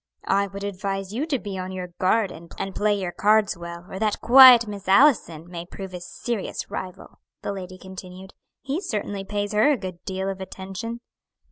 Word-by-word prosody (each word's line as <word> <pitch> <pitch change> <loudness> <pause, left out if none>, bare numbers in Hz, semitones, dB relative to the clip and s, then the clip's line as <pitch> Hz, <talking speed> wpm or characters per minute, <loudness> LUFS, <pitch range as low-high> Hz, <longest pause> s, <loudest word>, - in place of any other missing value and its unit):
"I 200 +1 +2
would 200 +1 -8
advise 195 0 -3
you 275 +8 -2
to 290 -4 +1
be 200 -5 -6
on 185 0 -5
your 185 -1 -5
guard, 195 +2 +2
and 170 +1 -11 0.2
play 205 0 +1
your 185 -2 -3
cards 210 +2 +3
well, 170 0 -8
or 190 - -7
that 215 -1 0
quiet 250 -1 +9
Miss 205 -3 -8
Allison 190 - +4
may 175 -1 -6
prove 190 +1 -9
a 180 - -6
serious 215 +4 -4
rival," 185 0 -7 0.2
the 200 - -2
lady 185 -1 -7
continued. 185 0 -10 0.3
"He 280 +6 -2
certainly 205 - -3
pays 205 +1 -3
her 215 +7 +4
a 285 - +2
good 185 -4 -7
deal 190 0 -3
of 190 -1 -4
attention." 195 +5 -6
195 Hz, 190 wpm, -24 LUFS, 185-215 Hz, 0.3 s, quiet